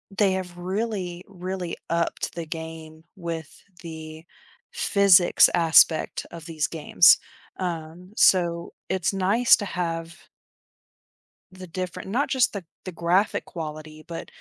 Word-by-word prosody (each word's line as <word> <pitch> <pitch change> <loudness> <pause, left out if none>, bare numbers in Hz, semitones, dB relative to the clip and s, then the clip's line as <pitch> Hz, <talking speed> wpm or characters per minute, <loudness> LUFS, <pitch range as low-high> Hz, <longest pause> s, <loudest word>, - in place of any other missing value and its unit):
they 195 -2 +3
have 180 -2 -5
really, 185 -1 -3
really 185 -2 -5
upped 170 0 -2
the 170 -1 -5
game 160 0 -8
with 165 -4 -7 0.2
the 160 -1 -9 0.5
physics 195 -4 +5
aspect 165 -1 +4
of 165 -2 -10
these 155 -3 -2
games. 165 +2 +5 0.4
Um, 175 +1 -6
so 170 -4 +3 0.2
it's 190 -1 0
nice 200 +6 +4
to 205 - -5
have 170 -2 -4 1.3
the 185 0 -11
different 180 +2 -6
not 255 +7 0
just 260 -4 +2
the 200 - -4
g 170 - -30 0.2
the 185 - -6
graphic 175 +4 0
quality, 155 -1 -8
but 165 0 -7
175 Hz, 125 wpm, -24 LUFS, 165-185 Hz, 1.3 s, physics